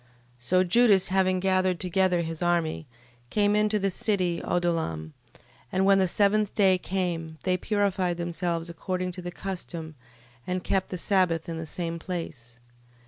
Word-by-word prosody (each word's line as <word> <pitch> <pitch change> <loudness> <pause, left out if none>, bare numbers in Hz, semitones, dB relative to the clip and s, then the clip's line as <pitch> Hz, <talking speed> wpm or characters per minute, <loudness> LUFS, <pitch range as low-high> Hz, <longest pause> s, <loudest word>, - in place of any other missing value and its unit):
12:38. 120 - -31 0.3
So 185 +10 +2
Judas 200 0 +4
having 185 -1 +2
gathered 185 -1 +1
together 180 -1 +2
his 165 0 -5
army, 170 -3 0 0.4
came 205 +5 +2
into 210 0 +2
the 195 -1 0
city 185 -3 0
Odollam: 160 - -1 0.6
and 190 +1 +1
when 195 0 +5
the 190 - +3
seventh 205 +2 +2
day 190 -3 +4
came, 170 -4 -3
they 185 -1 +2
purified 190 -3 0
themselves 170 -1 -2
according 180 +2 -3
to 180 +1 -7
the 175 - -5
custom, 175 -4 -6 0.5
and 180 0 -2
kept 190 -1 0
the 180 - -4
sabbath 180 -3 +1
in 165 -1 -4
the 160 - -6
same 170 +1 -4
place. 145 -10 -6
180 Hz, 155 wpm, -27 LUFS, 170-190 Hz, 0.6 s, when